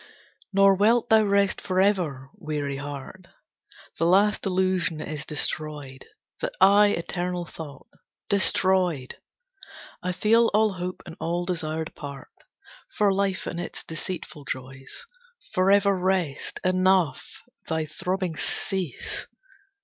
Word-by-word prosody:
Nor 195 0 +6
wilt 225 +5 +3
thou 220 -1 +6
rest 200 -1 +2
forever, 185 -9 0
weary 150 -7 -4
heart. 145 +6 -8 0.7
The 165 - +3
last 200 +3 +3
illusion 185 -3 0
is 155 -1 -5
destroyed, 150 -3 -3 0.3
That - - -3
I 205 +1 +7
eternal 175 -1 -2
thought. 155 -4 -10 0.4
Destroyed! 185 -7 +2 0.8
I 180 - -1
feel 225 +5 +3
all 215 -1 +3
hope 180 0 -5
and 165 -3 -9
all 175 +1 -1
desire 160 -3 -2
depart, 140 -4 -9 0.7
For 205 -2 +4
life 195 -1 0
and 170 - -4
its - - -5
deceitful 160 -2 -6
joys. 130 +1 -7 0.5
Forever 200 +2 +4
rest! 185 -6 -1
Enough! 185 -6 +1 0.2
Thy 160 -1 -1
throbbings 180 0 -3
cease! 185 - -3
180 Hz, 110 wpm, -25 LUFS, 155-195 Hz, 0.8 s, I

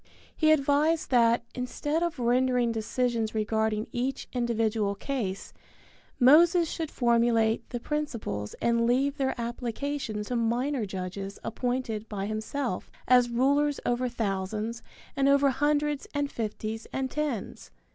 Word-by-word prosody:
He 310 -1 +4
advised 305 +2 +2
that, 235 -1 +4
instead 290 +5 -2
of 345 -3 -1
rendering 250 0 +2
decisions 225 0 -1
regarding 220 0 0
each 255 +2 -2
individual 225 -4 0
case, 200 -5 -4 0.7
Moses 330 +6 +6
should 320 -2 -3
formulate 235 -3 +2
the 240 - -4
principles 230 - -3
and 235 0 +1
leave 275 +4 +2
their 265 -3 -1
application 235 -1 -3
to 245 +4 -4
minor 240 +1 0
judges 190 +1 -5
appointed 235 -3 -2
by 200 -2 -3
himself 220 +1 -3 0.2
as 250 -1 +5
rulers 280 +4 +2
over 245 +1 0
thousands 215 +1 -3 0.3
and 275 0 +3
over 280 0 +4
hundreds 295 +1 0
and 285 0 -1
fifties 220 0 -4
and 265 -1 -2
tens. 290 - -3
240 Hz, 125 wpm, -28 LUFS, 220-280 Hz, 0.7 s, Moses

